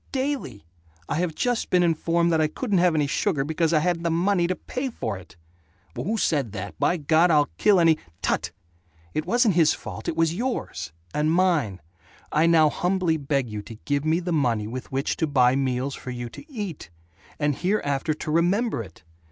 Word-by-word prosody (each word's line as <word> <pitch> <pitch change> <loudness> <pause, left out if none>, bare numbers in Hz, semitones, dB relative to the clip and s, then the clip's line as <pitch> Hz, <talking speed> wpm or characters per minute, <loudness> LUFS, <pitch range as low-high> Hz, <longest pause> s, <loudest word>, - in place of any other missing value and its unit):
Daily! 260 - -3 0.4
I 145 - -1
have 170 -2 -1
just 245 -2 -1
been 180 -1 +4
informed 170 +1 +1
that 160 - +3
I 155 - +3
couldn't 200 - -1
have 175 -2 +3
any 150 -2 +2
sugar 145 +1 0
because 160 +2 0
I 155 -2 +3
hadn't 175 0 0
the 170 - 0
money 175 +2 +2
to 185 - -1
pay 260 +7 -4
for 110 - -4
it!" 95 -4 -13 0.6
"Who 190 - -2
said 140 - 0
that? 100 -3 -5
By 180 - +2
God, 160 +3 +3
I'll 150 -3 +3
kill 205 -3 +5
any 165 -2 +4
" 80 - -38
"Tut. - - 0 0.6
It 155 +2 -2
wasn't 235 0 +3
his 160 -2 +4
fault. - - -8
It 160 - -2
was 165 0 +2
yours. 240 - -3 0.2
And 150 +1 +1
mine. 165 - +1 0.5
I 160 +2 +3
now 160 -2 +6
humbly 180 -2 0
beg 140 -3 -1
you 105 -2 -5
to 110 +2 -10
give 145 0 0
me 160 +2 +2
the 175 -1 -3
money 120 -8 +1
with 125 +4 -7
which 135 +2 -1
to 160 - 0
buy 130 -3 +4
meals 135 0 -1
for 130 - -8
you 120 -1 -5
to 295 - -13
eat. 205 - -6 0.5
And 145 -2 0
hereafter 155 -6 0
to 155 - -5
remember 180 - +1
it. 85 -7 -12
160 Hz, 200 wpm, -25 LUFS, 135-180 Hz, 0.6 s, now